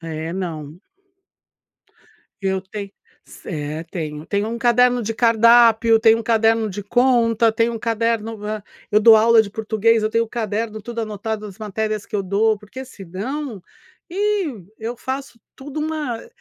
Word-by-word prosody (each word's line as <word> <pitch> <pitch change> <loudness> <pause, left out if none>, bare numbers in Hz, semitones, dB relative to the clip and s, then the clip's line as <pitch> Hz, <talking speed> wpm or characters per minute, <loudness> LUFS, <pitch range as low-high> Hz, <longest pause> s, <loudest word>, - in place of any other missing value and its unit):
É, 160 0 -5
não. 165 -3 -6 1.6
Eu 190 -1 0
tenho 200 +1 -7 0.3
cer 155 -1 -6
tenho. 155 -3 -5
Tenho 205 +1 -1
um 235 - -4
caderno 245 +1 +3
de 225 +1 -2
cardápio, 230 0 +5
tenho 225 0 +5
um - - -4
caderno 225 -1 +2
de 205 +2 -6
conta, 230 0 +3
tenho 230 +1 +1
um 225 - -4
caderno 225 -1 -1 0.5
eu 210 - +5
dou 220 +1 +8
aula 225 +1 +6
de 200 - -8
português, 220 +1 +1
eu 215 - +1
tenho 230 +1 +1
caderno 220 -1 -3
tudo 235 +2 -5
anotado 215 0 -4
as 200 -3 -10
matérias 215 0 -3
que - - -4
eu 200 - -1
dou, 210 +3 +1
porque 210 +6 -10
senão, 215 - -6 0.5
ih, 405 +1 0
e 185 - -14
eu 230 +2 -5
faço 265 0 -6 0.2
tudo 285 +2 -8
uma 300 -7 -3
220 Hz, 155 wpm, -21 LUFS, 200-235 Hz, 1.6 s, dou